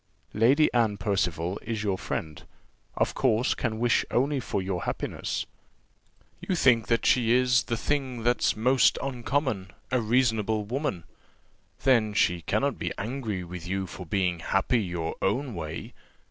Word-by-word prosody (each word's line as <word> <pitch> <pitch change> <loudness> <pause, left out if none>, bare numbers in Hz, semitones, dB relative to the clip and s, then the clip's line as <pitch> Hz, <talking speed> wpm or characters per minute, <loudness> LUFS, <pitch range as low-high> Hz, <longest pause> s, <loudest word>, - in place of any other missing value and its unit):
Lady 130 +8 +4
Anne 115 -4 +2
Percival 95 -2 -1
is 110 -2 -3
your 100 -3 +1
friend, 80 -4 -5 0.5
of - - +1
course 120 -2 +2
can 110 -3 -2
wish 120 +1 +2
only 140 +3 +1
for 115 - -2
your 95 -2 -3
happiness. - - -3 0.9
You 185 - -2
think 120 -8 +4 0.2
she 120 -2 +4
is 125 -1 +4
'the 115 - -3
thing 130 -2 -2
that's 120 +1 +2
most 125 +2 +3
uncommon, 125 -5 -1 0.2
a 130 -1 +2
reasonable 110 -2 +1
woman:' 125 - -2 0.8
then 115 -5 +3
she 90 -3 +2
cannot 80 - 0
be - - -2
angry 110 -4 -3
with 90 0 -8
you 95 +1 -1
for 90 0 -9
being 90 -1 0
happy 95 +7 +1
your 85 -4 -3
own 125 +6 0
way. 80 -3 -6
110 Hz, 145 wpm, -27 LUFS, 95-125 Hz, 0.9 s, Lady